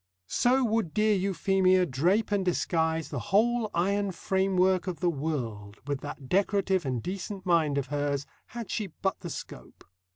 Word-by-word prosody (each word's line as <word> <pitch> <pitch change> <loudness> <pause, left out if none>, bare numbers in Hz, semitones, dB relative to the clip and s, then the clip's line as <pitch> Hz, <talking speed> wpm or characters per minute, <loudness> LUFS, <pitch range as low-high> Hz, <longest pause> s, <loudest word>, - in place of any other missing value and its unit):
So 255 - +2
would 220 -8 0
dear 215 0 +3
Euphemia 185 -1 +2
drape 175 - +1
and 200 -2 +2
disguise 160 -3 0
the - - -3
whole 225 +2 +3
iron 200 +3 0
framework 190 0 +1
of 180 -3 -3
the 175 -2 +2
world, 120 -9 -4
with 145 -2 -3
that 145 -2 -7
decorative 190 -1 +1
and 125 -3 -2
decent 190 +1 -5
mind 160 -5 +2
of 140 - 0
hers, 145 -1 -1 0.2
had 235 -3 -7
she 215 -3 -2
but 190 +2 -3
the 175 - -6
scope. - - -9
185 Hz, 160 wpm, -28 LUFS, 150-200 Hz, 0.2 s, dear